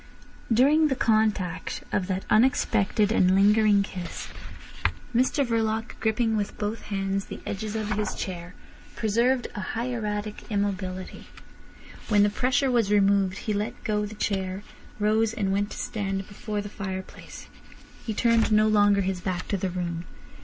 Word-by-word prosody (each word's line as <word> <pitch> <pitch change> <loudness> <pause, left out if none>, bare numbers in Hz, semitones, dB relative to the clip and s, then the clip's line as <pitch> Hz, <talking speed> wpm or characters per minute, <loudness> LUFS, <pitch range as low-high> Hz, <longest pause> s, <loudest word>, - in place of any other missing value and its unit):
During 290 +7 +5
the 270 - 0
contact 215 -7 0
of 185 -3 0
that 190 -1 -2
unexpected 215 -3 +3
and 185 -4 +4
lingering 205 0 +5
kiss 180 -3 -6 0.9
Mr 260 +3 +2
Verloc, 225 -1 0
gripping 220 0 +1
with 205 -2 -2
both 210 +2 -3
hands 195 -1 -2
the - - -8
edges 210 +2 -4
of 215 -1 -2
his 210 -1 -1
chair, 180 -1 -6 0.4
preserved 235 +4 +1
a 220 - -5
hieratic 215 -1 -3
immobility. 195 -3 -3 0.8
When 205 -2 +5
the 205 - +3
pressure 260 +4 +1
was 230 -4 +2
removed 200 -2 +3
he 215 - 0
let 205 +1 -3
go 210 -1 0
the 215 - -9
chair, 190 -1 -2 0.3
rose, 215 +1 +2
and 200 -4 0
went 205 +1 0
to - - -8
stand 195 -2 -3
before 210 0 -4
the 205 - -7
fireplace. 190 -2 -7 0.6
He 220 -3 -3
turned 230 -1 +3
no 215 0 +5
longer 205 -1 +4
his 190 -1 -2
back 185 -1 -3
to - - +1
the 190 0 -2
room. 175 -1 -3
210 Hz, 150 wpm, -26 LUFS, 195-220 Hz, 0.9 s, During